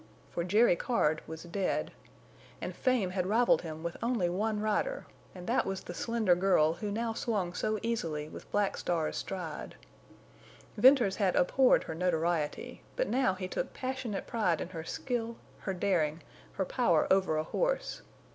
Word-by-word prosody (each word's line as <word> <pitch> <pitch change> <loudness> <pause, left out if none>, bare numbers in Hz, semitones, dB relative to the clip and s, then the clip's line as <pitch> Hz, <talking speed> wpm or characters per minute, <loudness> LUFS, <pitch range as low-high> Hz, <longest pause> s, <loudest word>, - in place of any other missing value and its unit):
For 170 - -2
Jerry 205 +3 +4
Card 160 -8 +1
was 160 0 -7
dead. 180 +2 -1 0.7
And - - -5
fame 245 -8 +1
had 185 -1 -1
rivaled 235 +4 +4
him 160 -1 -7
with 170 0 -4
only 230 -7 +1
one 210 +4 -1
rider, 215 - -1 0.3
and 180 -1 -8
that 240 +6 +2
was 195 -1 -4
the 175 - -7
slender 225 -1 +2
girl 175 -4 +3
who 210 +4 -4
now 225 +2 -1
swung 200 -7 -1
so 215 +4 -1
easily 165 -10 -2
with - - -11
Black 205 -1 +1
Star's 165 -3 -1
stride. 170 -5 -5 1.0
Venters 245 -4 +5
had 195 -4 +2
abhorred 255 +8 +4
her - - -5
notoriety, 165 -2 -1
but - - 0
now 250 -7 +2
he 185 -1 -4
took - - -3
passionate 255 -5 -3
pride 210 -9 +1
in - - -4
her 165 -3 -6
skill, 235 +5 -3 0.2
her 190 - -3
daring, 165 -5 0 0.3
her 190 - -1
power 180 -8 +2
over 190 -5 +3
a 155 - +1
horse. - - -1
190 Hz, 165 wpm, -31 LUFS, 170-230 Hz, 1.0 s, Venters